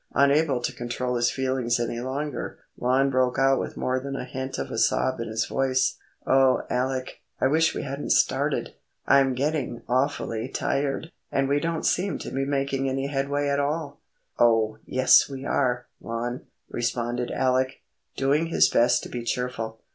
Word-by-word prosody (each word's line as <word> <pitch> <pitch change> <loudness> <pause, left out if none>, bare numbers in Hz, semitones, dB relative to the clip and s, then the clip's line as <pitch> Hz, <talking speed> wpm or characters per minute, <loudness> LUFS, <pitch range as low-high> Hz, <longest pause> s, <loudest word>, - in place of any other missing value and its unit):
Unable 140 -1 +3
to - - -2
control 125 +1 -3
his 120 0 +2
feelings 130 -3 0
any 120 0 -2
longer, 140 +4 -4 0.2
Lon 130 +2 +2
broke 130 -1 +1
out 135 0 +4
with - - -5
more 130 0 0
than 135 +1 -5
a 130 - -4
hint 130 +1 -5
of - - -4
a - - -4
sob 125 +3 +2
in 115 - -3
his 110 +1 -1
voice,— 130 -1 0 0.3
"O 130 -1 +4
Alec, 130 0 -2 0.2
I - - +2
wish 160 +4 +3
we - - -3
hadn't 140 +1 -5
started! - - +1 0.3
I'm 135 -2 +4
getting 140 -3 -2
awfully 130 -3 -1
tired, 140 +4 -1 0.2
and 135 0 +1
we 140 +1 +2
don't 165 +1 -2
seem 190 +2 +1
to - - -7
be 135 +1 -1
making 135 -1 0
any 135 +1 -2
headway 140 +1 -1
at 140 0 +1
all." 145 +1 -2 0.4
"Oh, 115 -2 +3
yes 130 +2 +5
we 135 0 -7
are, 125 -4 0 0.2
Lon," 120 +2 -4 0.2
responded 120 0 -2
Alec, 130 0 0 0.3
doing 145 +4 +2
his 165 - +4
best 120 +1 +3
to - - -7
be 120 - -4
cheerful. 115 -2 -3
130 Hz, 170 wpm, -25 LUFS, 125-140 Hz, 0.4 s, yes